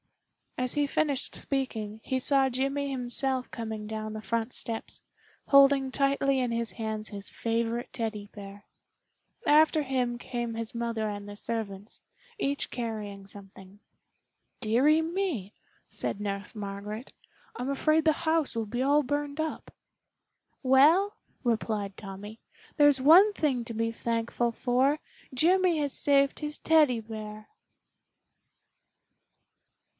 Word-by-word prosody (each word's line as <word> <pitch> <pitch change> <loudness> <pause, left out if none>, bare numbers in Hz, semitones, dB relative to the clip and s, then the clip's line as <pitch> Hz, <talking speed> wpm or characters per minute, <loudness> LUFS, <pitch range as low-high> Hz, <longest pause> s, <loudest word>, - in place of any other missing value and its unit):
As 255 0 -1
he 290 -1 +2
finished 280 -2 0
speaking 220 -6 -2
he 260 - -1
saw 270 0 +3
Jimmy 275 +2 -1
himself 260 0 -1
coming 220 -2 -5
down 215 0 -4
the 215 - -5
front 230 +2 -2
steps, 225 -2 -5 0.5
holding 275 -1 +6
tightly 275 0 +2
in 250 -2 0
his 230 -1 -2
hands 220 -1 -4
his 200 -1 -6
favorite 230 +1 -2
Teddy 215 -4 -4
bear. 200 -1 -10 0.8
After 310 +1 +5
him 250 -3 -1
came 240 -1 -4
his 225 0 -5
mother 230 -2 -1
and 205 -1 -5
the 205 - -8
servants, 205 -2 -5 0.4
each 280 -5 -1
carrying 210 -4 -5
something. 195 0 -12 0.8
"Dearie 255 +8 +3
me!" 325 - -2 0.3
said - - -3
Nurse 200 +2 -3
Margaret, 210 +3 -6 0.4
"I'm 250 +2 -3
afraid 310 +3 +2
the 315 - +5
house 320 -5 +1
will 225 -1 -1
be 240 +4 -2
all 290 +2 +4
burned 290 +2 -2
up." 315 0 -3 0.9
"Well," 305 +10 +5 0.3
replied 215 -4 -1
Tommy, 205 +2 -9 0.4
"there's 290 -3 +5
one 360 +9 +7
thing 270 -9 0
to 230 - -6
be 230 +1 -1
thankful 230 +1 -1
for, 260 +5 +1 0.3
Jimmy 355 +5 +3
has 285 -2 -1
saved 280 -1 +2
his 300 0 -4
Teddy 300 -7 +4
bear." 215 -1 -8
240 Hz, 125 wpm, -28 LUFS, 215-280 Hz, 0.9 s, one